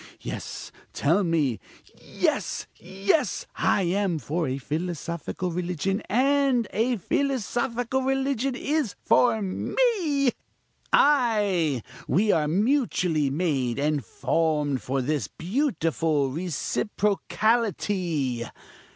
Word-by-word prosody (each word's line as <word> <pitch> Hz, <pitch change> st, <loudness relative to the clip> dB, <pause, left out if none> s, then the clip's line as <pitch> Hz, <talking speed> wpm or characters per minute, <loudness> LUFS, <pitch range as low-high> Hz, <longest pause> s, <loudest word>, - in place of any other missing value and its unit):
Yes! -, -, -6 dB, 0.2 s
tell 170 Hz, +8 st, +2 dB
me! 155 Hz, -, +1 dB, 0.4 s
Yes! -, -, -2 dB
yes! 200 Hz, -, 0 dB
I 195 Hz, -, +2 dB
am 185 Hz, -1 st, 0 dB
for 155 Hz, +3 st, -2 dB
a 130 Hz, +1 st, -2 dB
philosophical 170 Hz, +4 st, -3 dB
religion, 180 Hz, +3 st, -1 dB
and 265 Hz, 0 st, +3 dB
a 235 Hz, +3 st, +1 dB
philosophical 245 Hz, +2 st, -1 dB
religion 270 Hz, -1 st, 0 dB
is 285 Hz, -5 st, -1 dB
for 225 Hz, -3 st, +4 dB
me 295 Hz, -, +1 dB, 0.6 s
ay! 205 Hz, -, +3 dB, 0.2 s
we 210 Hz, +4 st, +3 dB
are 150 Hz, -2 st, +2 dB
mutually 180 Hz, -, +1 dB
made 135 Hz, -6 st, 0 dB
and 145 Hz, -1 st, 0 dB
formed 145 Hz, 0 st, 0 dB
for 135 Hz, 0 st, -1 dB
this 150 Hz, +2 st, -1 dB
beautiful 165 Hz, -, 0 dB
reciprocality! 185 Hz, -, 0 dB
185 Hz, 90 wpm, -26 LUFS, 155-245 Hz, 0.6 s, for